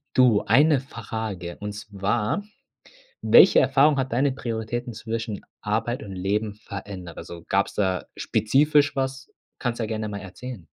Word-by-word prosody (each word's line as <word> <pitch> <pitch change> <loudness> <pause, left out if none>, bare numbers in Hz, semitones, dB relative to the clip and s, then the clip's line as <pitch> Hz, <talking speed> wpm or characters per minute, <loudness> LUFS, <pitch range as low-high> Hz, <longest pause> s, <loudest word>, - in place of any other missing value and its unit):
Du, 125 -5 +5
eine 150 0 +5
Frage, 110 -8 -6
und 105 0 -5
zwar: 105 - -2 0.8
Welche - - +7
Erfahrung 145 - +4
hat 130 -2 -1
deine 135 +3 +2
Prioritäten 120 0 -4
zwischen 110 -1 -4 0.2
Arbeit 115 +3 -1
und 100 - -8
Leben 100 +3 -1
verändert? 100 -4 -8
Also 85 -1 -9
gab's 100 +1 +1
da 95 -3 0
spezifisch 145 +6 +2
was? 135 0 -2 0.3
Kannst 120 -2 -2
ja 115 - -1
gerne 110 0 -3
mal 100 -1 -5
erzählen. 100 +1 -9
110 Hz, 140 wpm, -25 LUFS, 100-130 Hz, 0.8 s, Welche